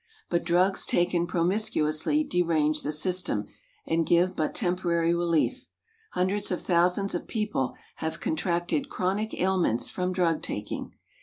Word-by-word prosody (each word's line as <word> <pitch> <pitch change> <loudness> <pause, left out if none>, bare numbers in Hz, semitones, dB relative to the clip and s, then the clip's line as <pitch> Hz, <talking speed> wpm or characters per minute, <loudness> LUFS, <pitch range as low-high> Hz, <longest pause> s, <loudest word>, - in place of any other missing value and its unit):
But 170 - +1
drugs 180 +3 +2
taken 175 0 +1
promiscuously 175 - +1
derange 160 - +1
the 150 - -2
system 155 - -1 0.4
and 165 0 +1
give 175 +3 +3
but 155 -1 -1
temporary 175 -4 +1
relief. 170 -2 0 0.5
Hundreds 190 +3 0
of 180 - -1
thousands 180 +3 +2
of 175 - -3
people 210 - -1 0.2
have 160 0 -3
contracted 175 - -1
chronic 195 +4 -1
ailments 180 -11 +1
from 180 0 -1
drug 175 -3 +1
taking. - - -5
175 Hz, 130 wpm, -27 LUFS, 165-185 Hz, 0.5 s, give